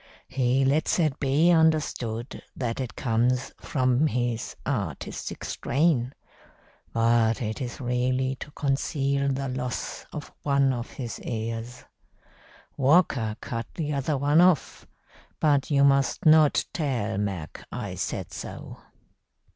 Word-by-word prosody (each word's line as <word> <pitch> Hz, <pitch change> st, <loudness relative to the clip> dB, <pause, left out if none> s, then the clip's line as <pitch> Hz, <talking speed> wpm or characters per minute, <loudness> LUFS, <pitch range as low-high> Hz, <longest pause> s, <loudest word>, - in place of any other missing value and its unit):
He 130 Hz, +1 st, +2 dB
lets 145 Hz, +4 st, +2 dB
it 155 Hz, -5 st, +1 dB
be 145 Hz, +5 st, +3 dB
understood 150 Hz, -8 st, +1 dB
that 120 Hz, -2 st, -3 dB
it 130 Hz, -3 st, -4 dB
comes 125 Hz, +2 st, +1 dB
from 130 Hz, +2 st, +2 dB
his 120 Hz, -4 st, -2 dB
artistic 100 Hz, -, -4 dB
strain, 135 Hz, -2 st, 0 dB, 0.8 s
but 115 Hz, -1 st, +3 dB
it 110 Hz, 0 st, -3 dB
is 125 Hz, +3 st, -5 dB
really 130 Hz, +1 st, 0 dB
to -, -, -8 dB
conceal 140 Hz, -1 st, 0 dB
the 135 Hz, 0 st, -2 dB
loss 125 Hz, -1 st, -4 dB
of 150 Hz, -2 st, -8 dB
one 140 Hz, -2 st, +2 dB
of 120 Hz, -1 st, -5 dB
his 120 Hz, -4 st, -6 dB
ears. 115 Hz, +1 st, -5 dB, 0.9 s
Walker 135 Hz, -6 st, +3 dB
cut 115 Hz, -3 st, -4 dB
the 150 Hz, -3 st, -2 dB
other 140 Hz, +1 st, 0 dB
one 145 Hz, +4 st, +4 dB
off, 180 Hz, -4 st, +2 dB, 0.5 s
but 145 Hz, -3 st, +2 dB
you 140 Hz, -2 st, +4 dB
must 140 Hz, +2 st, +3 dB
not 155 Hz, -1 st, +5 dB
tell 115 Hz, -, -1 dB
Mac 95 Hz, -6 st, -4 dB
I 105 Hz, -6 st, -4 dB
said 90 Hz, -2 st, -4 dB
so. -, -, -8 dB
130 Hz, 125 wpm, -26 LUFS, 115-145 Hz, 0.9 s, not